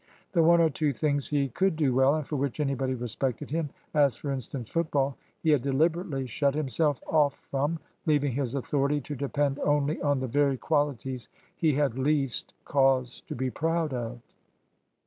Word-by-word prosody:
The 170 - +3
one 170 +1 +6
or 165 -1 +4
two 150 -1 0
things 145 0 0
he 140 -2 +1
could 190 +7 +1
do 145 -5 +2
well, 135 +3 +4
and 155 -2 -2
for 150 - -3
which 140 0 -2
anybody 135 -2 0
respected 125 +3 -3
him 160 -1 -1 0.2
as, 140 -5 +4
for 140 - -4
instance, 130 -2 -4
football 140 -4 0 0.3
he 160 - +4
had 145 -4 +4
deliberately 150 +1 0
shut 140 +3 0
himself 150 -1 0
off 145 -3 +3 0.2
from, 145 +4 0 0.3
leaving 145 -2 +3
his 130 -1 -2
authority 140 +2 0
to 145 +3 -6
depend 140 0 -1
only 145 +1 +1
on 145 -2 +2
the 130 - -2
very 140 +1 +2
qualities 135 -4 -1 0.3
he 155 -4 +2
had 140 -4 0
least 135 -2 0
cause 135 -3 +2
to - - -5
be 130 +1 -2
proud 165 -1 0
of. 120 -1 -4
140 Hz, 175 wpm, -28 LUFS, 130-150 Hz, 0.3 s, one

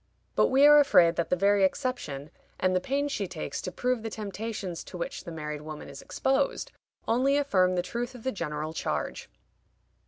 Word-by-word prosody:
But - - +4
we 270 +2 +5
are 295 0 +9
afraid 175 -12 +5
that 170 - 0
the - - +3
very 200 +2 +3
exception, 185 - -2 0.3
and 185 0 +2
the 185 - +2
pains 285 +6 -1
she 200 -6 -2
takes 170 -3 -5
to 185 - -5
prove 250 +3 -1
the 225 - -4
temptations 210 -3 -5
to 180 - -8
which 170 - -5
the 170 - -6
married 150 -2 -5
woman 155 -1 -8
is 140 0 -9
exposed, 270 +1 0 0.4
only 260 +5 +3
affirm 185 -10 +2
the 175 - 0
truth 240 +6 -4
of 240 - -11
the 260 - 0
general 155 -5 -4
charge. 75 - -3
195 Hz, 190 wpm, -28 LUFS, 170-255 Hz, 0.4 s, are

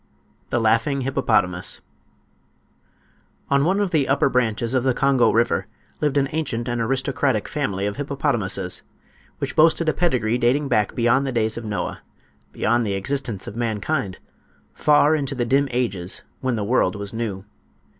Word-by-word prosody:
THE 120 - +1
LAUGHING 115 +5 +2
HIPPOPOTAMUS 90 -8 0 1.7
On 140 0 +4
one 190 +6 +2
of 200 -3 0
the 150 -5 +2
upper 140 0 +3
branches 115 -1 0
of 130 -2 +2
the 130 -2 +1
Congo 135 -2 +3
river 115 -4 +1 0.3
lived 145 -2 0
an 135 -1 +2
ancient 135 -7 -2
and 120 -1 -1
aristocratic 135 -1 0
family 100 -10 -2
of 100 0 -3
hippopotamuses, 115 -10 -1 0.6
which - - -4
boasted 165 +1 +4
a 155 - +3
pedigree 125 -9 +1
dating 135 +4 +2
back 105 -5 +1
beyond 120 +3 +2
the - - -1
days 110 -2 0
of 115 - -6
Noah—beyond 110 +2 -3
the 100 - -1
existence 115 -1 -3
of - - -7
mankind—far 120 +5 0
into 140 -2 -1
the 120 -2 -1
dim 140 +4 +2
ages 110 -8 -2 0.2
when 130 -2 -1
the 105 - -2
world 100 -4 +1
was 100 0 -4
new. 105 -4 -4
120 Hz, 150 wpm, -22 LUFS, 110-140 Hz, 1.7 s, On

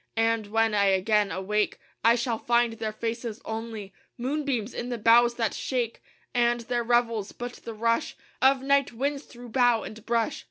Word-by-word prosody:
And 225 -1 +1
when 225 +1 +1
I 200 -1 +3
again 200 +2 +2
awake, 210 +3 -1 0.3
I 230 +1 +6
shall 235 -2 -1
find 235 -1 +2
their 220 -1 -4
faces 230 +1 -4
only 220 -3 -6 0.2
Moonbeams 255 -3 -2
in 245 - -4
the 240 - -2
boughs 235 +2 +5
that 225 -3 0
shake; 245 -3 -2 0.3
And 240 0 +2
their 240 0 -1
revels 230 -3 +1
but 245 0 -6
the 230 - -8
rush 230 +1 0 0.3
Of 265 0 +4
night 280 0 +2
winds 280 +4 -2
through 245 -1 -12
bough 245 -2 +3
and 215 0 -9
brush. 230 -1 0
230 Hz, 170 wpm, -27 LUFS, 220-245 Hz, 0.3 s, I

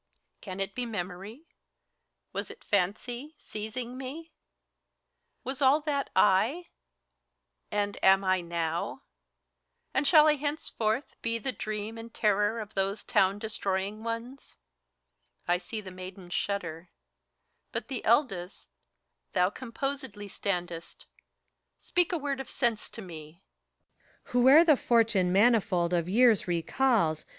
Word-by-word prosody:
Can 185 - -7
it 195 0 -1
be 250 - -3
memory? 200 - -6 0.9
Was - - -3
it - - -12
fancy, 240 - -1
seizing 235 +4 -6
met 275 +5 -6 1.2
Was 265 +1 -5
all 275 +3 +5
that, 290 -2 -1
It 225 - +3 1.1
and 205 -1 -2
am 190 +1 +6
I, 185 -1 +2
nowt 170 -1 -3 0.9
and 275 +2 +1
shall 310 -3 +7
I 300 -1 +4
hence 295 +2 -3
forth 220 +5 -2
be 230 0 -1
The 245 +4 -2
dream 215 -1 -5
and 230 +1 -9
terror 210 +1 +1
of 215 -1 -7
those 195 +2 -1
town 190 +1 +2
destroying 205 -1 -2
onest 230 +4 -6 0.9
I 175 0 +2
see 215 +4 -6
the 190 -2 -9
maidens 185 0 -9
shudder: 175 -4 -3 0.8
but, - - -4
the 265 -4 -4
eldest, 215 -7 0 0.6
thou 180 +1 +3
Composedly 260 -4 -5
standest 175 -4 -4 0.4
— - - -52
speak 355 0 0
a 350 - +1
word 280 -3 -2
of 270 - -6
sense 235 -4 -1
to 225 - -9
me! 165 0 -11 0.8
PHORKYAS. - - -17
Whoe'er 260 +6 +7
the 310 -5 +5
fortune 225 -8 +3
manifold 190 -4 +3
of 170 0 +1
years 225 -1 +4
recalls. 175 - +1
215 Hz, 130 wpm, -29 LUFS, 185-255 Hz, 1.2 s, shall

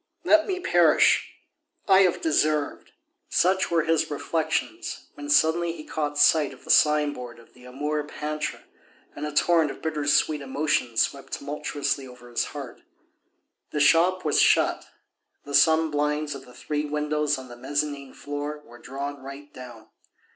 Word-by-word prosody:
Let 320 0 +4
me 375 -2 -2
perish! 370 - +3 0.6
I 190 -1 +6
have 185 -3 +3
deserved 155 -1 0 0.2
..." - - -54
Such 185 +1 +2
were 165 -2 +2
his 165 -1 +1
reflections 155 +2 -3
when 145 0 -9
suddenly 160 +3 +3
he 160 -2 -9
caught 145 -1 -3
sight 145 -1 +4
of 130 - -17
the - - -1
signboard 145 -6 +2
of 115 - -19
the 125 0 -17
Amour 150 +4 -3
peintre, 150 0 -5 0.5
and 150 +1 -4
a - - -5
torrent 160 +1 +3
of - - -8
bitter 155 -2 -2
sweet 150 0 +2
emotions 140 -4 0
swept 140 -1 -5
tumultuously 145 -1 -3
over 125 -1 -14
his 120 - 0
heart. - - -9 0.9
The 150 - -3
shop 170 +5 +3
was 150 - +3
shut, - - +3 0.6
the 145 - -9
sun 160 +2 +4
blinds 150 0 -1
of 135 -1 -10
the 125 - -15
three 150 -1 -3
windows 150 0 -1
on 130 -1 -9
the 120 - -11
mezzanine 145 +2 -3
floor 145 +1 -6
were 120 0 -15
drawn 140 +2 -6
right 140 +2 -10
down. 120 -4 -11
150 Hz, 160 wpm, -25 LUFS, 140-155 Hz, 0.9 s, I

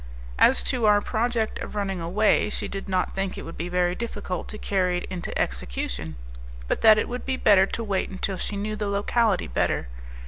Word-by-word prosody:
As - - +5
to 240 -4 +1
our 205 -1 +6
project 225 +1 -1
of - - -6
running 195 -3 -2
away, 210 +5 +2
she - - -3
did 195 0 -6
not 185 -1 0
think 195 -1 -2
it - - -6
would 165 - -8
be 175 +2 -4
very 180 0 +1
difficult 205 -4 -4
to 215 - -7
carry 185 -4 0
it 175 - -4
into 175 -2 -4
execution, 60 +5 -3 0.5
but - - -1
that 220 -1 +8
it - - 0
would 245 +1 -5
be 265 -1 -1
better 195 -4 +5
to 230 - -4
wait 200 -3 -1
until 190 0 -3
she 205 - -4
knew 215 +2 -2
the 210 -1 -3
locality 205 +1 +1
better. - - -1
200 Hz, 205 wpm, -25 LUFS, 180-215 Hz, 0.5 s, that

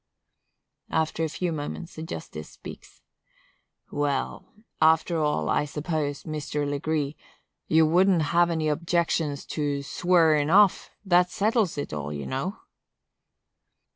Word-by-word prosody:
After 160 0 0
a 160 - 0
few 175 +3 -2
moments 160 +3 -5
the 155 - -8
justice 80 - -7
speaks: - - -12 0.9
"Well, 145 -2 -2 0.3
after 160 +1 +4
all, 150 - 0
I 150 - +1
suppose, 150 -1 -3
Mr. 150 -1 -3
Legree, 145 0 -1 0.5
you 160 0 +5
wouldn't 175 +1 +4
have 175 0 +4
any 160 -2 -1
objections 160 -2 0
to 145 -2 -2
swarin' 160 -2 +3
off; 200 +2 +4 0.2
that 180 -1 +4
settles 210 -4 +1
it 145 - -4
all, 75 -1 -4
you 70 -1 -5
know." 180 +11 -4
155 Hz, 120 wpm, -26 LUFS, 145-170 Hz, 0.9 s, you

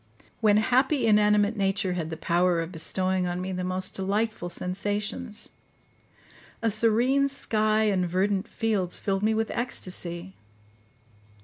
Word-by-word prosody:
When 210 -2 +4
happy, 255 +5 +2
inanimate 210 0 +4
nature 195 -2 0
had 165 -3 -3
the 160 - -5
power 175 +1 +2
of 165 +1 -4
bestowing 185 +2 -1
on 175 0 -2
me 185 +1 -4
the 180 0 -3
most 185 +1 -2
delightful 200 -1 -1
sensations. 205 +5 -4 1.1
A 225 - +2
serene 235 +6 +3
sky 215 -5 +1
and 190 -4 +1
verdant 190 +2 0
fields 205 -6 -1
filled 195 -1 -1
me 220 +1 +2
with 225 0 -1
ecstasy. 185 -6 -4
200 Hz, 130 wpm, -26 LUFS, 180-220 Hz, 1.1 s, When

